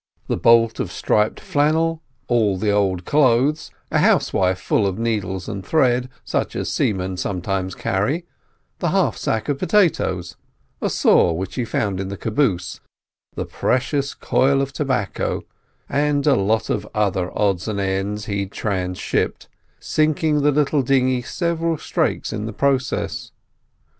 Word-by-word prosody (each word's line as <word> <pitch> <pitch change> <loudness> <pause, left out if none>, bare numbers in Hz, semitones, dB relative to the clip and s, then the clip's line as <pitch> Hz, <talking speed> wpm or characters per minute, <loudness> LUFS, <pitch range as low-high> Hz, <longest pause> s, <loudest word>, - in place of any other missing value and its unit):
The - - -1
bolt 115 -1 +4
of - - -2
striped 105 0 +1
flannel, 160 +2 +1 0.3
all 110 -5 +2
the 105 +2 +1
old 95 -3 +1
clothes, 145 +2 +2 0.2
a - - +2
housewife 95 -1 +2
full 100 - +1
of 95 0 -2
needles 100 -5 -2
and 100 -3 -5
thread, 125 - +2 0.2
such - - -2
as - - -2
seamen 95 -2 -1
sometimes 95 0 -2
carry, 135 - -1 0.5
the - - 0
half - - +2
sack 110 - -2
of 145 -2 -1
potatoes, 95 - +1 0.4
a - - 0
saw 85 - +4
which 95 +3 -4
he 125 - -2
found 100 -4 -1
in 95 - -3
the 100 +1 -5
caboose, 105 -7 -1 0.6
the - - -3
precious 140 +2 -1
coil 135 +1 +2
of 135 0 -2
tobacco, 130 -9 -1 0.4
and 145 0 +1
a 145 - +5
lot 100 +2 +1
of - - -2
other 95 -4 0
odds 100 -2 +1
and 105 -2 -2
ends 100 +2 -2
he 100 -2 -2
transhipped, 95 -2 -2 0.3
sinking 155 -1 +1
the 145 - +4
little 145 0 +2
dinghy 130 -1 +2
several 165 +4 -1
strakes - - -1
in 105 0 -3
the 110 - -5
process. 135 +1 -1
110 Hz, 145 wpm, -21 LUFS, 95-140 Hz, 0.6 s, a